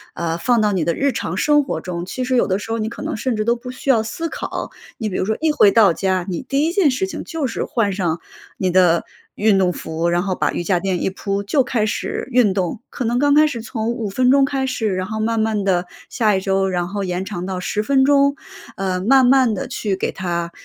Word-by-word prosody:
呃， 165 -1 -2
放 240 +6 +2
到 210 -1 +2
你 185 -4 0
的 170 - +1
日 280 0 +1
常 185 -7 -3
生 295 +6 +3
活 - - -3
中， 175 -1 -5
其 255 +7 -4
实 255 0 0
有 - - +3
的 190 -1 +1
时 225 - -7
候 225 - 0
你 215 - -1
可 235 - -9
能 - - -3
甚 250 +2 -1
至 215 - -1
都 235 +1 +3
不 250 +1 -8
需 265 +2 -6
要 235 -5 +5
思 330 +9 -4
考。 - - -5 0.3
你 220 -3 -3
比 185 - -5
如 - - 0
说 220 +2 -1
一 320 -1 +3
回 295 -9 +5
到 210 -4 +5
家， 185 +1 -1
你 175 - -3
第 275 +2 0
1 330 - 0
件 355 -4 +3
事 255 -6 -1
情 - - -6
就 320 -3 -3
是 240 - -2
换 220 -4 0
上 175 -4 -2 0.4
你 185 -1 0
的 175 -2 +4 0.3
运 210 -1 +3
动 185 -2 +2
服， 160 +1 -3
然 175 +1 +1
后 195 -1 -1
把 - - 0
瑜 - - -2
伽 180 0 +1
垫 185 -1 -2
一 - - +1
铺 200 +1 -3
就 270 +8 +2
开 240 -4 0
始 215 - -3
运 235 -6 +4
动。 185 -1 -2
可 - - -5
能 240 +1 0
刚 285 +1 +3
开 305 +1 +6
始 250 -7 -3
从 225 0 -3
5 235 -3 -3
分 250 +5 +2
钟 275 0 +5
开 270 -1 -1
始， 225 -6 -1
然 185 0 -2
后 220 0 -4
慢 225 +1 0
慢 220 -2 0
地 180 -2 +1 0.2
下 215 -4 +2
一 - - 0
周， 195 0 0
然 175 -1 -1
后 200 +2 -3
延 180 0 -3
长 180 -3 -5
到 185 -1 -3
10 210 +3 -2
分 265 +3 +3
钟， 280 0 +4 0.4
呃， 185 -1 -1
慢 260 +6 +5
慢 260 -3 +4
地 200 - -4
去 210 -6 -2
给 - - -2
它， 170 -2 -3
210 Hz, 275 characters per minute, -20 LUFS, 185-255 Hz, 0.4 s, 开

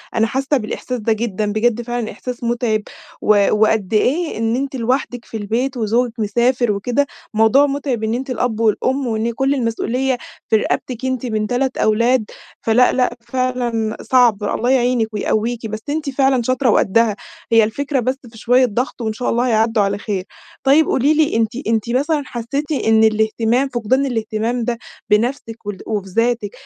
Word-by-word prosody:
أنا 225 - +3
حاسّة 270 +4 0
بالإحساس 250 +2 -4
ده 225 +1 +1
جدًا، 215 -2 -2
بجد 230 +2 +1
فعلًا 240 -1 -3
إحساس 250 -1 -7
متعِب 235 -2 0 0.4
و 205 -2 +4
وقدّ 215 -2 +2
إيه 295 +9 +1
إن 225 +1 0
أنتِ 270 +1 -3
لوحدِك 245 0 -1
في 225 - -6
البيت 240 +6 -2
وزوجِك 235 +1 0
مسافر 240 +2 +1
وكده، 245 +8 0 0.3
موضوع 225 +6 +5
متعِب 275 -5 -2
إن 220 +1 0
أنتِ 260 +3 -3
الأب 245 -2 -1
والأم، 255 +4 +1
وإن 225 0 -1
كل 270 +3 +1
المسؤولية 250 +1 -1 0.3
في - - +4
رقبتِك 245 +3 -1
أنتِ 260 -1 -2
من 215 -3 -1
3 260 +2 -1
أولاد، 235 +2 +2 0.4
فلأ، 235 +3 +4
لأ، 250 -1 0
فعلًا 240 -3 -2
صعْب، 240 -5 +3
الله 230 +4 -1
يعينِك 245 -3 +2
ويقويكِ، 225 +2 -1
بس 215 0 -5
أنتِ 300 0 -2
فعلًا 265 -1 +2
شاطرة 255 +1 +1
وقدّها، 220 +1 +3 0.4
هي 225 -1 +6
الفكرة 275 +6 -1
بس 255 +2 -1
في 225 - -15
شوية 250 +3 +3
ضغْط، 245 +2 -3
وإن 220 -1 -1
شاء 245 +3 -2
الله 240 +2 +1
هيعدّوا 225 -1 +2
على 200 0 0
خير. 205 -3 -3 0.4
طيّب 285 +4 +5
قولي 280 +4 +2
لي 310 -4 +2
أنتِ 225 0 +1 0.2
أنتِ 225 0 0
مثلًا 290 +5 +1
حسيتِ 270 +6 -4
إن 225 -6 +3
الاهتمام، 220 +4 +2
فقدان 250 +2 0
الاهتمام 230 -1 -2
ده 235 0 -1 0.3
بنفسِك 225 +1 0
ول 205 -1 -4
وبذاتِك، 215 +2 -1
235 Hz, 165 wpm, -19 LUFS, 220-255 Hz, 0.4 s, هي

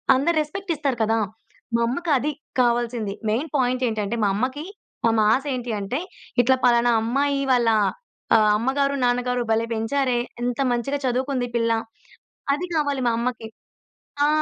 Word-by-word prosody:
అందరూ 315 +6 +1
రెస్‌పెక్ట్ 365 +5 -5
ఇస్తారు 280 -5 -1
కదా! 225 +1 +2 0.6
మా - - +2
అమ్మకి 325 +7 -3
అది 295 +4 -1 0.3
కావాల్సింది. 235 -3 +1 0.2
మెయిన్ 255 +9 -1
పాయింట్ 255 -1 +1
ఏంటంటే 220 0 -2
మా - - +4
అమ్మకి, 260 +7 -2 0.4
మా 230 - +4
మాశ 220 +6 +3
ఏంటంటే, 235 +1 -3 0.4
ఇట్లా 260 +2 +4
పలానా 240 0 +4
అమ్మాయి 275 +4 +1
వాళ్ళ 240 -2 +3 0.7
ఆహ్, 215 -1 +5
అమ్మగారు, 275 +4 0
నాన్నగారు 245 0 +1
భలే 225 +1 +2
పెంచారే, 245 +3 0 0.2
ఎంత 245 +1 -2
మంచిగా 275 +4 -1
చదువుకుంది 255 0 0
పిల్ల, 230 -1 +2 0.8
అది 340 +6 -2
కావాలి 285 -3 0
మా 235 - +2
అమ్మకి. 235 -2 -3 0.8
ఆ! - - +3
245 Hz, 140 wpm, -23 LUFS, 230-275 Hz, 0.8 s, ఆహ్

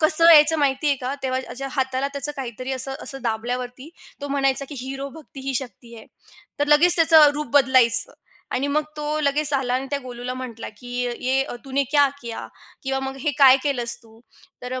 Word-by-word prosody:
कसं 325 +2 +4
यायचं 310 0 +7
माहिती 280 +1 0
आहे 280 - +1
का? 255 +2 -4
तेव्हा 260 +1 -4
हाताला 265 0 -2
त्याचं 285 +1 0
काहीतरी 255 0 -6
असं 265 +1 -2
असं 270 -1 -6
दाबल्यावरती 245 +4 -4 0.3
तो 285 - -6
म्हणायचा 275 0 0
की, 295 - -8
"हिरो 270 +2 -6
भक्ती 290 -2 -13
ही 270 - -2
शक्ती 240 -2 -6
है." 220 - -12 0.5
तर 290 - 0
लगेच 335 +4 +7
त्याचं 320 -3 +6
रूप 300 0 -4
बदलायचं. 255 -3 +5 0.4
आणि 275 +3 -1
मग 305 - +2
तो 300 0 -3
लगेच 295 +1 +1
आला 255 -2 -1
आणि 265 +1 -2
त्या 285 - -1
गोलूला 250 -1 -7
म्हटला, 245 -3 -8
की 245 - -12 0.3
"ये 265 +1 +1 0.2
तूने 275 +1 -1
क्या 285 -1 +4
किया?" 235 -1 -7 0.4
किंवा 270 0 -2
मग 270 - -8
"हे 295 - 0
काय 265 -1 +7
केलंस 245 -5 -1
तू?" 225 0 -20 0.4
तर 250 - -7
अ, 255 - -5
270 Hz, 190 wpm, -22 LUFS, 255-290 Hz, 0.5 s, यायचं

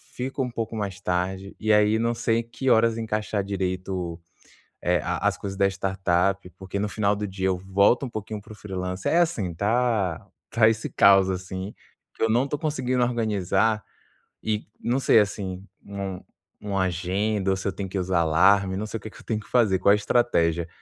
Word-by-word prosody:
fico 130 +2 -2
um 125 - -4
pouco 115 -1 -4
mais 100 -4 -4
tarde, 95 +2 -2
e 110 0 +1
aí 105 +1 +4
não 115 +1 +1
sei 115 0 +1
que 130 +3 -3
horas 115 0 +4
encaixar 105 -2 -2
direito 95 -1 -3
o 85 -2 -4 0.6
eh, 90 -2 +2
a - - -1
as - - -1
coisas 95 -1 -5
da 100 - +4
startup. 95 0 0
Porque 95 +1 -5
no 105 +1 -1
final 105 -1 +1
do 105 0 -3
dia 95 0 -2
eu 90 -1 0
volto 100 +8 +2
um - - -8
pouquinho 110 -1 -5
para 110 - -12
o - - -12
freelancer. 90 -2 -4
É 170 - +4
assim, 120 - +1
tá 105 -4 0 0.2
tá 110 -1 +4
esse 110 0 -1
caos 95 -1 +5
assim, 95 +2 -5 0.4
que - - -7
eu 115 - +3
não 125 +5 +2
tô 145 - -2
conseguindo 130 -5 -1
organizar, 110 -2 0 0.6
e 110 -1 -2
não 125 +3 0
sei 120 -3 +5
assim, 95 -2 -2 0.2
um 100 -2 -5 0.4
uma 100 -2 -1
agenda? 95 +3 -1
Ou - - +2
se 95 - -4
eu - - +1
tenho 100 -1 -5
que 95 - -3
usar 90 -1 +1
alarme? 95 +4 +4
Não 105 - -3
sei 115 - -4
o - - -12
que 110 - -7
que - - -15
eu - - -14
tenho 110 -2 -1
que - - -13
fazer. 110 -7 +3
Qual 100 - +4
a - - +7
estratégia? 85 -7 +1
100 Hz, 205 wpm, -25 LUFS, 95-110 Hz, 0.6 s, a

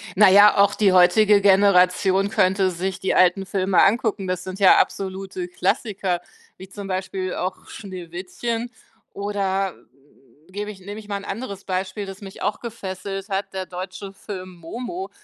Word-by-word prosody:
Na 205 0 +7
ja, 205 +2 +7
auch 200 +1 +4
die 205 -3 +3
heutige 200 +3 +5
Generation 195 0 +4
könnte 190 -2 +2
sich 185 +2 -4
die 190 - -1
alten 185 +2 +4
Filme 190 -1 +2
angucken. 205 -2 +1
Das 185 0 -2
sind 185 +1 -7
ja 195 -2 +7
absolute 190 -1 -2
Klassiker, 190 0 -1 0.4
wie 190 - -11
zum 200 +1 -8
Beispiel 185 0 -3
auch 185 +1 -4
Schneewittchen 195 +5 -5 0.4
oder 195 -2 -1 0.8
gebe 205 +2 -5
ich 200 -3 -10
nehme 205 +3 -8
ich 210 - -13
mal 205 - -3
'n 200 - -9
anderes 200 -2 -6
Beispiel, 190 +2 -3
das 195 0 -9
mich 195 -1 -11
auch - - -1
gefesselt 195 -3 -6
hat, 195 0 -3
der 190 -1 -4
deutsche 185 +2 -7
Film 190 -2 -8
Momo. 250 - -6
195 Hz, 160 wpm, -22 LUFS, 185-205 Hz, 0.8 s, Na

